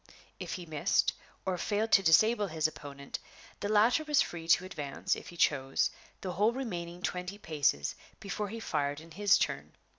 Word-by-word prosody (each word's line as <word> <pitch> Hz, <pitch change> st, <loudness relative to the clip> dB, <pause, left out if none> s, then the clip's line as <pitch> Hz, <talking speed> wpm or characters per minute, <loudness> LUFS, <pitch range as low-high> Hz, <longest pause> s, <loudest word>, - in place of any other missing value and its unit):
If -, -, -5 dB
he 180 Hz, -, -5 dB
missed, 155 Hz, -3 st, +1 dB, 0.3 s
or 185 Hz, -2 st, -1 dB
failed 215 Hz, +3 st, 0 dB
to 195 Hz, -, +7 dB
disable 205 Hz, +5 st, +4 dB
his 160 Hz, -2 st, +1 dB
opponent, 140 Hz, -2 st, -8 dB, 0.4 s
the 205 Hz, -, -2 dB
latter 225 Hz, +8 st, +4 dB
was 300 Hz, -2 st, +2 dB
free 165 Hz, -1 st, -1 dB
to 170 Hz, +2 st, +4 dB
advance, 145 Hz, -7 st, -2 dB
if -, -, -10 dB
he 175 Hz, -, -12 dB
chose, 135 Hz, -4 st, +2 dB, 0.3 s
the 185 Hz, -, -3 dB
whole 210 Hz, +6 st, +2 dB
remaining 175 Hz, -9 st, -5 dB
twenty 180 Hz, +2 st, -3 dB
paces 145 Hz, -, 0 dB, 0.3 s
before 200 Hz, +1 st, -4 dB
he 230 Hz, +3 st, -6 dB
fired 145 Hz, -7 st, -1 dB
in 165 Hz, +1 st, -14 dB
his 200 Hz, +3 st, +4 dB
turn. -, -, -2 dB
180 Hz, 175 wpm, -31 LUFS, 155-210 Hz, 0.4 s, to